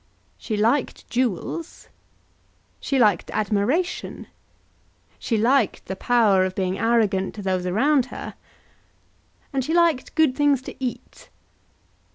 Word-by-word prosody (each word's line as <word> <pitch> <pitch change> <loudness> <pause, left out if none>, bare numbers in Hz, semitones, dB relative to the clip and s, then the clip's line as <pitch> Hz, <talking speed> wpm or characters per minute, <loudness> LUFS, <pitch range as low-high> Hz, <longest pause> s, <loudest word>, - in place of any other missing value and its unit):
She 215 - -3
liked 230 +6 0
jewels. 255 - -3 0.9
She 275 - -1
liked 210 -8 +3
admiration. 215 - -1 0.9
She 230 - -1
liked 240 0 +1
the 190 - -5
power 215 -4 +3
of 185 0 -2
being 190 0 -2
arrogant 215 -4 +1
to 205 - -7
those 185 -1 -1
around 260 +7 +2
her. - - -8 1.2
And 265 -1 0
she 320 +6 -1
liked 335 -6 +2
good 310 -5 +3
things 285 -2 +2
to - - -8
eat. 250 - -6
235 Hz, 120 wpm, -23 LUFS, 195-275 Hz, 1.2 s, liked